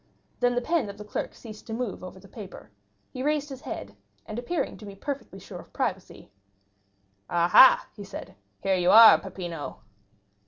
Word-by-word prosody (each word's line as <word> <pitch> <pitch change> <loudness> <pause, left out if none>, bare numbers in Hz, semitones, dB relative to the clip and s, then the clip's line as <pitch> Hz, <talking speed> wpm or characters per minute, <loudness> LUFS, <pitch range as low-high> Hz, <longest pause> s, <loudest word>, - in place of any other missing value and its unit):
Then 245 0 +2
the 245 - 0
pen 320 -9 0
of 200 - -9
the 210 - -9
clerk 210 - -4
ceased 215 -3 -12
to 225 - -5
move 230 -5 -4
over 185 +1 -9
the 195 - -16
paper; 190 - -11 0.4
he 255 - -6
raised 295 +1 0
his 270 -1 -8
head, 100 0 -7 0.3
and 215 - -5
appearing 320 +7 -2
to 215 - -11
be 200 - -9
perfectly 265 -2 -6
sure 195 - -10
of - - -14
privacy: - - -4 1.0
"Ah, 170 0 +2
ha," 260 +8 +7
he 205 - -8
said, 195 - -9 0.3
"here 195 - +2
you 180 -1 +2
are, 225 +2 +9
Peppino!" 175 -5 -7
210 Hz, 185 wpm, -26 LUFS, 190-250 Hz, 1.0 s, are